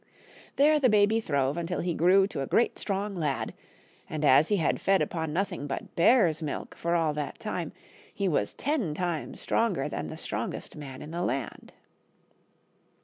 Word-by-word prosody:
There 300 +2 +5
the 260 -3 +4
baby 210 +1 +4
throve 140 -5 0
until 170 +1 -2
he 175 0 -1
grew 185 +4 +5
to 140 - -4
a 135 - -3
great 235 - +2
strong 200 0 -2
lad, 155 -7 -2 0.6
and 155 -1 -2
as 145 +3 +6
he 210 - +2
had 160 - 0
fed 195 0 +3
upon 160 -2 -2
nothing 180 -3 -2
but 135 - -6
bear's 170 -4 +4
milk 150 -2 -4
for 170 +1 -1
all 160 -3 +2
that 150 -1 -4
time, - - -4 0.4
he 200 - -2
was 145 - 0
ten 255 - -1
times 175 -2 -3
stronger - - 0
than - - -4
the - - -7
strongest - - -5
man 135 -3 -8
in 150 - -9
the 170 +1 -3
land. 135 -7 -3
170 Hz, 175 wpm, -28 LUFS, 150-195 Hz, 0.6 s, as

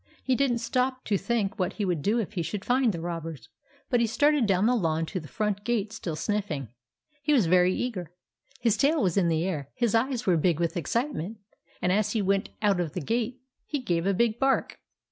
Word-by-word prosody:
He 260 - +2
did 270 -1 +2
n't 235 - -1
stop 255 +2 -1
to 205 - +1
think 210 -1 -1
what 185 - 0
he 210 - -2
could 175 -5 0
do 210 +10 +1
if 215 -3 -2
he 180 - -1
should 195 +4 -4
find 250 -1 +3
the 170 - -5
robbers, 165 -4 -5 0.4
but 245 - +2
he 235 - +3
started 290 +1 +3
down 195 0 +3
the 245 - +4
lawn 165 -6 0
to 185 +3 -4
the 155 - -10
front 210 0 -2
gate 220 -2 -1
still 180 -8 -4
sniffing. 170 - -2 0.5
He 300 +1 +2
was 245 -9 +4
very 180 +2 +4
eager. 185 -10 -3 0.5
His 230 -3 +2
tail 290 -1 +3
was 180 -4 +1
in 190 -3 +3
the 165 0 +1
air, 150 -7 -3
his 235 -4 +1
eyes 240 +1 +1
were 180 -3 +4
big 165 0 +2
with 170 -1 0
excitement, 225 - -2 0.5
and 180 - +3
as 210 +2 +1
he 220 - +1
went 195 +1 +1
out 200 -3 +3
of 165 -4 -2
the - - -2
gate 240 - -2 0.3
he 295 - -1
gave 175 -9 -1
a 200 - +3
big 235 +1 +1
bark. 270 0 +1
205 Hz, 225 wpm, -27 LUFS, 175-240 Hz, 0.5 s, the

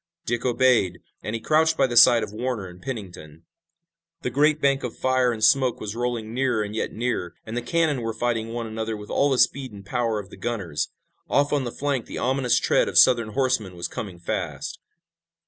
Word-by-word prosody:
Dick 120 0 -2
obeyed, 120 -7 +2 0.2
and 110 - -4
he - - -3
crouched 160 +5 +2
by 135 - +4
the 120 -2 -3
side 115 -1 +7
of 105 -1 -6
Warner 120 -2 -3
and 90 0 -12
Pennington. 90 - -8 0.8
The 125 - -2
great 150 +4 +3
bank 140 -1 +2
of 125 - -5
fire 130 -1 +2
and 110 -2 -5
smoke 130 +1 +4
was 105 0 -5
rolling 120 -2 -3
nearer 125 -4 +1
and 105 +1 -6
yet - - -2
nearer, 110 -7 -3
and 110 - -6
the 120 - -1
cannon 160 -3 0
were 115 0 -2
fighting 115 0 -2
one 120 0 -4
another 110 0 -4
with 105 0 -10
all 145 - +2
the 135 - +1
speed 130 0 +2
and 100 -1 -12
power 115 -1 -1
of 100 -2 -7
the - - -11
gunners. 95 -11 -3 0.4
Off 145 +1 +2
on 140 -3 +1
the 120 - -4
flank 140 -3 -2
the - - -7
ominous 130 -1 +1
tread - - +2
of - - -2
Southern 115 -4 +5
horsemen 130 -8 0
was 85 - -4
coming 95 -5 -7
fast. 85 - -4
120 Hz, 210 wpm, -24 LUFS, 110-130 Hz, 0.8 s, side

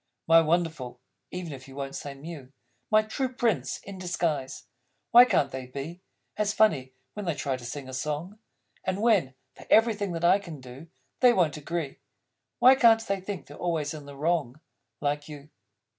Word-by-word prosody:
My 165 0 +7
Wonderful 160 -7 -1 0.3
(even 180 -4 -6
if 130 -1 -10
you 135 - -12
Won't 135 -1 -5
say 140 -1 -6
Mew), 140 -2 -9 0.4
My 215 0 +5
True 255 +4 -2
Prince 240 -6 0
in 195 -1 -9
Disguise! 165 -7 -2 0.5
Why 245 +1 +10
can't 145 - +1
they 130 -1 -6
be 140 +7 -7 0.4
As 210 0 0
funny, 145 -13 +2 0.2
when 210 -1 -6
they 165 - 0
try 135 -1 -2
to 130 - -10
sing 130 +3 -6
a 130 - -8
song? 150 +10 -4 0.4
And 190 +1 -2
when, 190 - +3 0.2
for - - -14
everything 215 -4 +3
that 170 0 -1
I 185 +3 +5
can 170 -7 -9
do, 130 +5 -11 0.3
They 250 -2 +6
Won't 170 -8 +2
Agree, 155 -1 -4 0.6
Why 255 - +8
can't 225 -3 +5
they 195 -2 -1
think 190 -5 -6
they're 145 - -12
always 160 -4 -1
in 150 -2 -9
the 140 -1 -10
wrong? 155 -3 0 0.4
Like 145 +1 -1
You! 150 0 -10
165 Hz, 180 wpm, -27 LUFS, 140-195 Hz, 0.6 s, Why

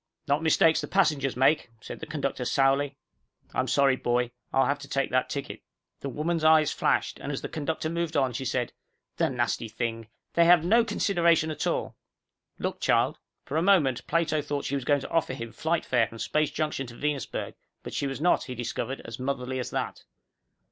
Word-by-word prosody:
"Not 145 +2 +2
mistakes 160 0 +4
the - - -5
passengers 145 -9 +1
make," 135 +1 +3
said - - -8
the 160 - -7
conductor 140 -4 -2
sourly. 135 +2 +2 0.6
"I'm - - 0
sorry, 140 -2 +4
boy, 120 -1 0 0.2
I'll 135 - +3
have 145 +1 0
to - - -9
take 135 -1 -1
that 130 0 +1
ticket." 140 -1 -5 0.4
The 140 - -4
woman's 155 +5 -1
eyes 155 -1 +5
flashed - - 0
and, - - -4
as - - -4
the - - -2
conductor 155 +1 -3
moved 170 0 -2
on, 130 -2 +2
she 130 - -3
said, 125 -1 -1 0.4
"The - - +2
nasty 115 - -1
thing. 115 0 -3 0.3
They 170 - +5
have 170 -1 +6
no 230 +6 +5
consideration 170 -7 +2
at 150 - -2
all. - - -2 0.6
Look, - - -3
child." - - +2 0.3
For 145 - -2
a - - +3
moment 165 -10 +3
Plato 160 -2 +1
thought 145 -1 -3
she - - -3
was 135 -3 -2
going 145 0 +3
to - - -7
offer 160 -5 +1
him 115 -3 -6
flight 160 +8 -1
fare 120 -3 +2
from 115 - -11
Space 155 +5 0
Junction 150 -3 -2
to 120 - -11
Venusberg, 150 +1 -3 0.3
but - - -7
she 140 - -1
was 135 0 -4
not, 175 +4 +2
he 130 - -6
discovered, 125 +2 -4
as 115 +1 -7
motherly 130 -1 -2
as 125 - -3
that. - - -4
140 Hz, 200 wpm, -27 LUFS, 130-160 Hz, 0.6 s, have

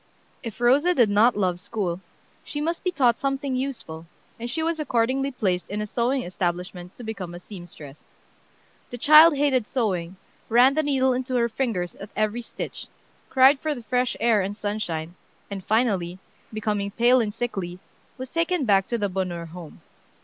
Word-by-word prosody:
If 230 -4 -7
Rosa 280 +9 +4
did 235 -7 +4
not 215 +3 +4
love 180 -3 0
school, 180 -3 -3 0.4
she 295 - -5
must 335 +3 -2
be 365 - +1
taught 250 -9 +2
something 275 -1 -1
useful, 235 -12 -5 0.3
and 235 +1 -5
she 320 +6 -2
was 330 0 -1
accordingly 265 0 +1
placed 190 -9 -2
in 205 - -3
a 210 - -2
sewing 245 +5 0
establishment 180 0 -4
to 245 - -10
become 195 -6 -6
a - - -8
seamstress. 175 -7 -11 0.9
The 245 - -6
child 305 +4 +7
hated 265 -6 +2
sewing, 190 -8 -2 0.3
ran 245 +4 +6
the 310 - +2
needle 265 -3 +2
into 255 +1 -2
her 235 -1 +3
fingers 220 -8 -2
at 200 - -9
every 215 +3 0
stitch, 230 - -7 0.4
cried 265 +1 +6
for 310 0 -2
the 240 - -9
fresh 250 +2 0
air 225 -3 +3
and 200 +2 -4
sunshine, 180 -7 -3 0.4
and 195 -1 -5
finally, 200 -6 0 0.3
becoming 210 -2 -2
pale 240 +4 +4
and 215 -2 -1
sickly, 195 -6 -4 0.4
was 260 0 -7
taken 335 -2 0
back 195 -3 +3
to 235 - -1
the 205 -2 0
Bonheur 180 -3 -3
home. 165 -1 -11
230 Hz, 170 wpm, -24 LUFS, 190-260 Hz, 0.9 s, child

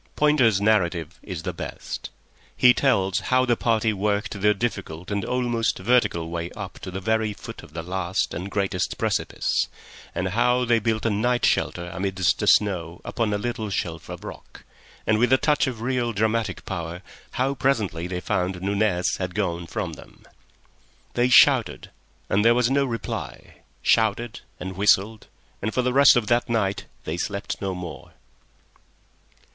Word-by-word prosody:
Pointer's 130 -9 +4
narrative 90 -6 +1
is 90 -5 -6
the - - -3
best. - - -6 0.5
He 125 -1 +7
tells 100 -8 +2
how 130 +6 +2
the 120 - 0
little 120 - +3
party 110 -2 +2
worked 100 0 -1
their 105 +1 +4
difficult 95 -6 -4
and 100 -1 -1
almost 120 -2 0
vertical 95 -6 +2
way 85 0 -3
up 100 -4 -7
to - - -7
the 95 +1 -5
very 110 +1 0
foot - - -9
of 75 - -15
the 80 0 -5
last 90 +1 -2
and 90 +4 -5
greatest 100 -2 -1
precipice, - - 0 0.5
and 95 +1 -1
how 125 +4 +2
they 115 -1 +3
built 110 0 -1
a 115 - +2
night 120 +4 +1
shelter 85 0 0
amidst 95 -2 0
the - - -1
snow 90 -5 +2
upon 115 -3 -1
a 105 - +1
little 110 0 -3
shelf 85 -4 -4
of - - -7
rock, - - -10 0.4
and, 110 -1 +2
with 125 +1 +3
a 130 - +7
touch 150 0 +2
of 120 -4 -4
real 120 -1 0
dramatic 110 -1 -1
power, 85 0 -5 0.3
how 130 +2 0
presently 110 - 0
they 90 0 -3
found 90 0 -1
Nunez 100 -1 0
had 90 -1 -4
gone 85 -4 -2
from - - -3
them. - - -14 0.9
They 120 +1 +2
shouted, 125 - +5 0.4
and 100 +2 +2
there 115 +1 +5
was 125 +1 +2
no 140 0 +3
reply; 115 -3 -5 0.3
shouted 110 +1 +2 0.2
and 95 +1 -6
whistled, 105 +2 +2 0.3
and 110 - -1
for 125 - 0
the 125 0 0
rest 140 +1 +7
of 120 -3 +2
that 120 +2 +1
night 100 -4 0 0.2
they 80 - -3
slept 100 +3 -4
no 95 -2 -2
more. 90 -3 -8
105 Hz, 170 wpm, -24 LUFS, 95-120 Hz, 0.9 s, He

